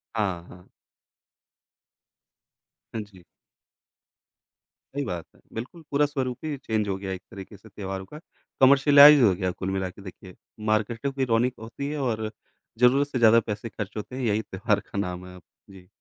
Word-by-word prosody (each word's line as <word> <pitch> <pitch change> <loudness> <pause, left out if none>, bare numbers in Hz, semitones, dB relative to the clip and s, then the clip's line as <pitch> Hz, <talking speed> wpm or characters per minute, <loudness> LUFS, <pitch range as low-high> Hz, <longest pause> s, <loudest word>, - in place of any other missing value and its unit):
हाँ, 95 -6 -1
हाँ। 90 0 -15 2.2
हाँ 110 - -3
जी। 95 -3 -18 1.7
सही 145 - -1
बात 90 -7 -4
है। - - -23
बिल्कुल, 125 +9 -7
पूरा 145 +1 +3
स्वरूप 130 -4 -3
ही 150 -2 -3
चेंज 110 -5 -2
हो 95 - 0
गया 95 0 -6
है 95 - -2
एक 90 - -11
तरीके 100 -1 -10
से 110 +3 -17
त्योहारों 95 -2 -6
का, 150 - -11 0.4
कमर्शियलाइज़ 140 +2 +8
हो 100 -5 +5
गया 95 0 -2
है 90 - -1
कुल 95 - -2
मिलाके 95 0 -4
देखिए। 95 -1 -11 0.4
मार्केटों 115 +5 0
की 135 -1 -1
रोनिक 120 +1 +2
होती 115 +5 -6
है 150 - -3
और 110 -4 -2 0.5
ज़रूरत 130 +3 +4
से 135 -3 -3
ज़्यादा 115 0 +7
पैसे 110 0 -5
खर्च 105 +1 -6
होते 105 +4 -6
हैं, 130 - -4
यही 110 -2 +1
त्योहार 105 +1 -1
का - - -5
नाम 90 -2 -4
है 90 - -11
अब। 90 - -13 0.3
जी। 95 -2 -15
110 Hz, 175 wpm, -26 LUFS, 95-130 Hz, 2.2 s, कमर्शियलाइज़